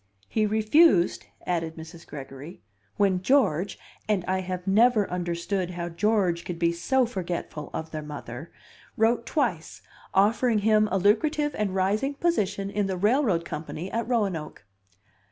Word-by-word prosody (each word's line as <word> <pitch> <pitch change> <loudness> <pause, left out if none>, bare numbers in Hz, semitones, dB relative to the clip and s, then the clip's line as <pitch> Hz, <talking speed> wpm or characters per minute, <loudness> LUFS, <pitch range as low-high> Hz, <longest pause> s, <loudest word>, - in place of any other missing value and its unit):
"He 215 -1 +1
refused," 215 - +3 0.2
added 165 -2 -2
Mrs. 165 +1 -11
Gregory, 140 +3 -9 0.3
"when 195 -3 +2
George 200 - +2 0.3
(and 195 -4 +1
I 185 +1 0
have 185 -1 -5
never 215 +2 +4
understood 175 +1 -2
how 175 -1 -4
George 185 -1 +1
could 175 - -5
be 170 0 +2
so 250 +10 +1
forgetful 175 -8 -5
of 160 0 -5
their 155 - -4
mother) 150 -1 -8 0.5
wrote 230 +1 +2
twice, 220 - -2 0.3
offering 220 +4 +3
him 215 -1 +4
a 195 - +2
lucrative 295 - +2
and 200 -3 -2
rising 210 +9 0
position 200 - 0
in 205 -1 0
the 190 -1 -2
railroad 205 - +2
company 160 +4 -6
at 230 0 -2
Roanoke." 195 - -2
195 Hz, 140 wpm, -26 LUFS, 170-220 Hz, 0.5 s, never